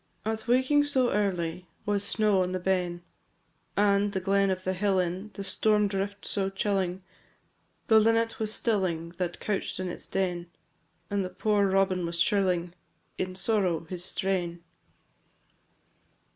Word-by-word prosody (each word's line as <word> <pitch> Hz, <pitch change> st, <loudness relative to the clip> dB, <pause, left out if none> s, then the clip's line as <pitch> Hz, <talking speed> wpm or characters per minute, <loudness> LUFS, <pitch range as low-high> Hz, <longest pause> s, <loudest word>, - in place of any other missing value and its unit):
I. 220 Hz, -, +1 dB
At 220 Hz, +1 st, -5 dB
waking 260 Hz, +4 st, +4 dB
so 260 Hz, -4 st, +2 dB
early 180 Hz, -4 st, -1 dB, 0.2 s
Was 205 Hz, -1 st, +1 dB
snow 205 Hz, -1 st, +2 dB
on 180 Hz, 0 st, -1 dB
the 185 Hz, -, -1 dB
Ben, 180 Hz, -2 st, -1 dB, 0.7 s
And, 200 Hz, 0 st, +3 dB
the 190 Hz, -, 0 dB
glen 195 Hz, +1 st, +2 dB
of 185 Hz, 0 st, -2 dB
the 185 Hz, -, 0 dB
hill 195 Hz, +1 st, +1 dB
in, 185 Hz, +3 st, -1 dB
The 200 Hz, -, -5 dB
storm 210 Hz, +2 st, +2 dB
drift 200 Hz, +1 st, -3 dB
so 195 Hz, -2 st, -1 dB
chilling 190 Hz, -2 st, -1 dB, 0.8 s
The 220 Hz, -1 st, +6 dB
linnet 225 Hz, +1 st, +2 dB
was 215 Hz, -1 st, 0 dB
stilling, 185 Hz, -8 st, 0 dB
That 175 Hz, -2 st, -3 dB
couch'd 205 Hz, -3 st, -2 dB
in 185 Hz, -1 st, -2 dB
its -, -, -6 dB
den; 175 Hz, -2 st, -2 dB, 0.6 s
And 195 Hz, -2 st, -2 dB
poor 210 Hz, -2 st, +2 dB
robin 190 Hz, -1 st, +2 dB
was 170 Hz, 0 st, -3 dB
shrilling 180 Hz, -2 st, +1 dB, 0.5 s
In 185 Hz, 0 st, -2 dB
sorrow 190 Hz, -5 st, +1 dB
his 175 Hz, +1 st, -5 dB
strain. 180 Hz, -3 st, -2 dB
195 Hz, 145 wpm, -28 LUFS, 180-210 Hz, 0.8 s, The